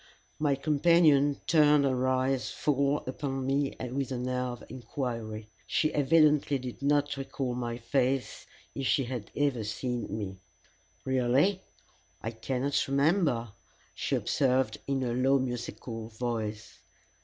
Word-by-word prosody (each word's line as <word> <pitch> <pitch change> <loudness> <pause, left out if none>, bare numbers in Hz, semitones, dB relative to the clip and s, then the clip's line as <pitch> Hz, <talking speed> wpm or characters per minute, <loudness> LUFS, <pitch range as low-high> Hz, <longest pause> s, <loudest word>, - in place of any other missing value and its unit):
My 145 -2 +2
companion 145 -1 +4
turned 150 -3 +5
her 130 -1 +1
eyes 130 -2 +1
full 140 0 0
upon 135 0 -3
me 135 +1 0 0.2
with 135 0 -2
an 125 0 -2
air 125 0 -1
of 120 -3 -6
inquiry. 115 -4 -5 0.2
She 155 - +1
evidently 150 -1 +4
did 125 0 -7
not 145 0 +1
recall 135 -2 -3
my 120 -1 -3
face, 130 +2 -1 0.3
if 135 - -2
she 135 - +3
had 120 -4 -5
ever 140 -5 +1
seen 120 +3 -3
me. 95 -3 -5 0.7
"Really 130 +9 +2 0.6
I 115 - -4
cannot 130 +4 -1
remember," 140 - +2 0.4
she - - -1
observed, 130 -2 +1
in 135 -1 0
a 120 -2 -1
low 130 +3 +3
and 130 -1 +2
musical 120 -2 -5
voice. 110 -2 -4
130 Hz, 130 wpm, -29 LUFS, 120-140 Hz, 0.7 s, turned